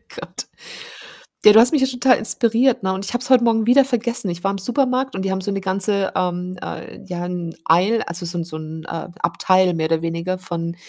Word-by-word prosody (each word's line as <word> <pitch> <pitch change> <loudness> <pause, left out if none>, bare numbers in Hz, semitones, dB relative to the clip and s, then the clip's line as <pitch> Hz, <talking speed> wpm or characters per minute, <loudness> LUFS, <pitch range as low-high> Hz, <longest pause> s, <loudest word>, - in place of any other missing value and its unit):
Gott. - - -8 1.0
Ja, 210 - +9
du 220 - +8
hast 240 +2 +4
mich 295 -4 +2
ja - - +4
total 250 0 +3
inspiriert, 235 +1 +1
ne, 190 - 0
und 190 +1 -5
ich 200 - -4
habe 245 0 -2
es - - -2
heut 255 -2 +5
Morgen 225 -2 +2
wieder 265 +3 +6
vergessen. 235 -5 +1
Ich 175 0 -6
war 195 - +2
im 200 - -3
Supermarkt 255 +5 0
und 190 - -3
die 195 - -1
haben 190 0 -2
so 200 - -3
'ne 195 - -2
ganze, 195 +1 -1
ähm, 180 0 -2
äh - - -8
ja 175 -1 -5
'n 175 -2 -5
Eil 190 +8 +3
also 170 +1 -5
so 175 +1 -3
'n 170 - -2
so 165 -1 -8
'n, 160 +1 -8
ähm, 165 +1 -6
Abteil 185 +1 +2
mehr 160 -1 -1
oder 160 0 0
weniger 170 +2 -3
von 170 -2 -5
190 Hz, 235 wpm, -20 LUFS, 175-235 Hz, 1.0 s, Ja